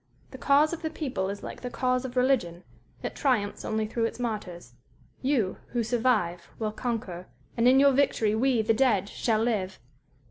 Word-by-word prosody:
The - - -10
cause 295 +3 +4
of 335 - -5
the 315 - -2
people 255 - -3
is 200 0 -6
like - - -7
the 250 - -4
cause 255 +1 0
of 255 0 -6
religion 230 -10 +1 0.4
it - - -4
triumphs 235 -8 0
only 220 0 -1
through 230 +1 -1
its - - -3
martyrs.... 190 - -5 0.5
You 255 -8 0 0.2
who 240 -1 +1
survive 220 -8 0
will 215 -1 -2
conquer, 215 -6 -4 0.3
and 230 +1 +3
in 260 +1 +6
your 280 0 +6
victory 255 -6 +2
we, 235 0 +2
the 225 +1 +3
dead, 220 -5 +2
shall 225 -1 0
live_.... 195 -6 -1
230 Hz, 180 wpm, -27 LUFS, 205-255 Hz, 0.5 s, in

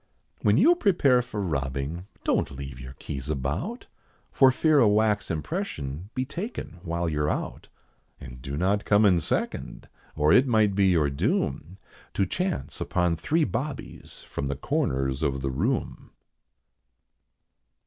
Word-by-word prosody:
When 105 0 +4
you 320 - +6
prepare 165 - +3
for 105 -4 -4
robbing, 70 +2 -3 0.2
don't - - +1
leave 70 -2 -8
your 65 0 -9
keys 70 0 -6
about, 75 - -3 0.5
For 135 -1 +6
fear 155 +3 +3
a 120 - +6
wax 105 0 +2
impression 80 - -4
be 130 - -1
taken 175 - -6
while 85 -1 -2
you're 75 -1 0
out; - - -4 0.5
And 60 0 -10
do 70 +2 -5
not 100 +5 +1
come 105 +1 +4
in 90 -4 +5
second, 80 - -3 0.3
or 75 +1 +3
it 130 +2 +6
might 110 -4 +3
be 100 0 +3
your 80 -6 +3
doom 75 +5 -1 0.4
To 100 - +2
chance 180 - -3
upon 90 -2 +1
three 155 - +1
bobbies 135 +2 -5
from 70 - -4
the 70 - -2
corners 65 0 -1
of 70 -3 -1
the 70 - -1
room. 110 - -2
90 Hz, 145 wpm, -26 LUFS, -, 0.5 s, you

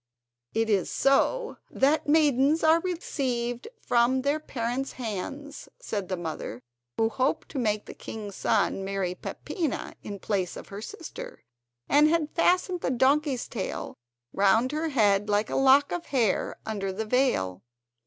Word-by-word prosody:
"It 225 0 +2
is 200 -4 +1
so 460 - +2
that 295 +2 +2
maidens 295 0 +4
are 320 +1 +6
received 260 - -2
from 245 - +2
their 285 +2 +1
parents' 255 -2 -3
hands," 265 +6 -6
said 205 - -4
the 185 - -1
mother, 160 -8 -5 0.3
who 225 - +3
hoped 265 +6 -1
to 280 - -4
make 215 -3 0
the - - -9
king's 205 -3 -7
son 200 -2 +1
marry 195 -2 -2
Peppina 315 - -4
in 205 - -6
place 190 -2 -2
of - - -10
her 200 +1 -7
sister, 485 - -8 0.4
and 295 +2 +5
had 315 -2 +1
fastened 360 +1 +2
the - - 0
donkey's 265 +1 +2
tail 200 -6 -4 0.4
round 220 +6 +3
her 315 +2 -1
head 210 -6 +3
like 210 +1 +1
a - - -1
lock 270 +1 +5
of 350 -1 -3
hair 235 -8 +1
under 200 -3 -2
the 220 +4 -3
veil. 215 - +1
255 Hz, 150 wpm, -27 LUFS, 205-295 Hz, 0.4 s, are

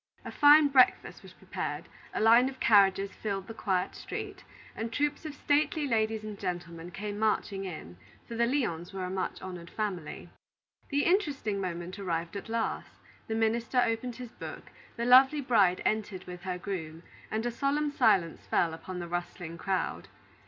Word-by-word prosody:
A - - -5
fine 295 +1 +7
breakfast 260 -2 +3
was - - -14
prepared, - - -5 0.2
a - - -3
line 235 +4 +6
of 260 -1 -11
carriages 195 -2 +4
filled 195 -3 -4
the 225 - -8
quiet 190 -4 -1
street, - - -7 0.3
and 225 +1 -4
troops 295 +5 -1
of 300 -2 -6
stately 295 +1 +1
ladies 220 -3 0
and 215 -2 -7
gentlemen 175 -2 -5
came 205 +2 -5
marching 205 -2 0
in; 120 - -8 0.3
for - - -7
the 235 +1 +2
Lyons 195 - -1
were 190 -1 -4
a 180 - -4
much 190 0 -3
honored 180 -2 -7
family. 190 -8 -4 0.6
The 285 0 +1
interesting 285 - +1
moment 180 +1 -5
arrived 170 -2 -3
at 200 +3 -6
last, 230 0 -2 0.3
the 220 - -2
minister 230 +3 +1
opened 230 +1 -2
his 245 -2 -8
book, - - -9 0.2
the 235 - -2
lovely 265 +4 +7
bride 210 -9 +3
entered 210 -4 -1
with 180 -1 -9
her 180 -1 -2
groom, 170 -4 -6 0.3
and 220 +2 -2
a 240 - 0
solemn 285 +4 0
silence 210 - +2
fell 165 -2 +2
upon 180 +3 -7
the 175 -1 -5
rustling 175 -1 -5
crowd. 190 -1 -2
210 Hz, 170 wpm, -30 LUFS, 180-245 Hz, 0.6 s, fine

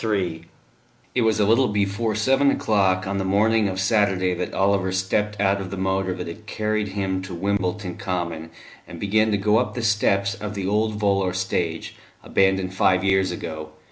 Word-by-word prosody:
III 90 -7 -1 0.7
It 125 - +1
was 110 -1 +2
a 105 - +4
little 115 +5 +4
before 105 +1 -1
seven 135 +6 +3
o'clock 95 -6 +1
on 100 +1 -2
the - - -1
morning 105 +3 +2
of 95 0 -4
Saturday 95 -2 +2
that 90 0 -4
Oliver 95 -1 +1
stepped 100 +2 -1
out 100 0 +2
of 95 - -6
the 100 - -6
motor 95 0 0
that 90 - -5
had 105 +6 -9
carried 110 -1 -1
him 95 -1 -2
to 95 -1 -7
Wimbledon 95 0 -2
Common, 85 -3 -4 0.4
and 85 - -9
began 110 +3 +2
to 105 - +1
go 105 +3 +3
up 125 - -2
the 120 - -3
steps 100 -3 +2
of 105 +1 -6
the 100 -2 -3
old 105 +2 0
volor 100 -3 +1
stage, 90 -3 -2 0.3
abandoned 95 -1 +1
five 95 -1 +2
years 95 -1 +2
ago. 80 -3 -6
100 Hz, 185 wpm, -23 LUFS, 95-105 Hz, 0.7 s, a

